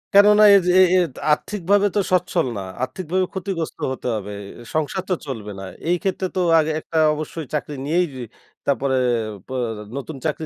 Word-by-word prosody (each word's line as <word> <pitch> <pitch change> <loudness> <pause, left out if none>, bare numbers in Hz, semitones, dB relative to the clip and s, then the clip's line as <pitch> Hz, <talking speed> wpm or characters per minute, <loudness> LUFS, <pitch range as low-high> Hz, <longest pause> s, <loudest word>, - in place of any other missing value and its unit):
কেননা 210 +1 +7
এইযে 180 -2 +4
এ - - +9
এ - - +6 0.3
আর্থিকভাবে 200 +5 +2
তো - - +3
সচ্ছল 180 -2 +2
না। - - -3 0.2
আর্থিকভাবে 185 +7 -1
ক্ষতিগ্রস্ত 185 -4 -4
হতে 130 - -6
হবে। 105 -1 -5 0.4
সংসার 155 +4 -1
তো - - +3
চলবে 110 -6 -5
না। - - -7 0.3
এই 175 - +4
ক্ষেত্রে 190 -1 -1
তো - - 0 0.2
আগে 155 0 +1
একটা 160 - -5 0.2
অবশ্যই 155 +1 -5
চাকরি 150 0 -2
নিয়েই 175 +4 +2 0.6
তারপরে 140 -1 +1 0.5
পোঁ 130 - -5 0.4
নতুন 140 +3 -6
চাকরি 160 0 -1
165 Hz, 160 wpm, -22 LUFS, 145-185 Hz, 0.6 s, এ